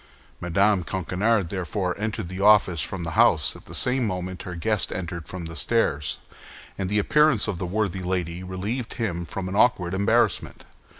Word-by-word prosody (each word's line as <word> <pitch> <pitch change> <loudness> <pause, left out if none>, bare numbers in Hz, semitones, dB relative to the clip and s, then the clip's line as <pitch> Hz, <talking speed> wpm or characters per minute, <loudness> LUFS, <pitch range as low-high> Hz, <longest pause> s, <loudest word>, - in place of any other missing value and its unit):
Mme. 100 +3 +2
Coquenard 95 +3 0
therefore 95 0 -2
entered 105 -4 -3
the 95 +2 -6
office 100 -6 +5
from 95 -3 -4
the 80 - -4
house - - +3
at - - -14
the - - -6
same 125 -2 +2
moment 90 -1 -4
her 90 -3 -7
guest 105 +4 0
entered 85 -2 -5
from 90 -2 -6
the 80 0 -7
stairs, 80 -9 0 0.6
and 95 -2 -3
the 105 - 0
appearance 135 +2 +4
of 100 -5 -3
the 90 - -3
worthy 95 -1 -1
lady 90 -1 -2
relieved 100 +7 -4
him 90 -7 -2
from 95 +2 -5
an 95 - -4
awkward 95 -6 +3
embarrassment. 100 +1 +1
95 Hz, 175 wpm, -24 LUFS, 90-105 Hz, 0.6 s, office